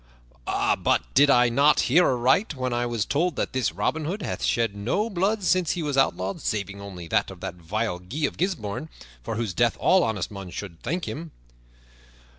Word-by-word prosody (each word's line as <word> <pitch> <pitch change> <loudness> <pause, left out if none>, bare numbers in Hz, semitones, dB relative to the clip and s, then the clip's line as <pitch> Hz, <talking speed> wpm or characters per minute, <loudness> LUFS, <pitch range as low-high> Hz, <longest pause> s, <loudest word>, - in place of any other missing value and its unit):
"But - - +1
did 145 +2 +6
I 125 -2 +5
not 140 +5 +4
hear 170 +8 +4
aright 130 - +2
when 130 -2 -2
I 120 0 0
was 115 -3 -1
told 165 +3 0
that - - -2
this 130 -8 0
Robin 125 - -1
Hood 190 +6 -3
hath - - -4
shed 115 -3 +1
no 130 - -1
blood 200 +3 0
since 180 -2 +2
he 175 - -3
was 145 -2 -1
outlawed, 100 -8 +1
saving 100 -1 -3
only 90 -4 -8
that - - +1
of - - -10
that - - -4
vile 90 +3 -3
Guy 130 - -3
of - - -3
Gisbourne, 160 - -2 0.3
for 85 - -4
whose 110 -4 -2
death 120 +4 +2
all 185 -1 +4
honest 105 -3 -2
men 100 -2 -7
should 85 -2 -8
thank 175 +3 -2
him?" 165 +2 -5
125 Hz, 195 wpm, -25 LUFS, 100-160 Hz, 0.3 s, did